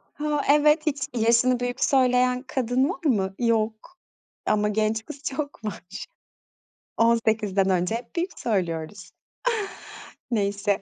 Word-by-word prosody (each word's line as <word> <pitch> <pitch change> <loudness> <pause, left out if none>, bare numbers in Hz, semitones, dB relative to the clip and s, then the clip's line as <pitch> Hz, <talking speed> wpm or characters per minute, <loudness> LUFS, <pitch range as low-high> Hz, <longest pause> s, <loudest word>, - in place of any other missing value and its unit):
Ha, 295 -1 -1
evet, 300 +2 +4
hiç 280 -3 -1
yaşını 235 +2 +3
büyük 245 +1 -1
söyleyen 250 -1 +3
kadın 260 +1 0
var 365 -3 -7
mı? 195 -8 +1
Yok. 230 +7 -1 0.5
Ama 210 0 +2
genç 215 +1 0
kız 285 -2 -10
çok 285 -4 -4
var. 190 -3 -6 0.9
18'den 220 -4 +2
önce 180 +3 +1
hep 240 +8 -7
büyük 355 +2 -2
söylüyoruz. 180 -3 -2 1.2
Neyse. 200 -2 0
230 Hz, 115 wpm, -25 LUFS, 210-270 Hz, 1.2 s, evet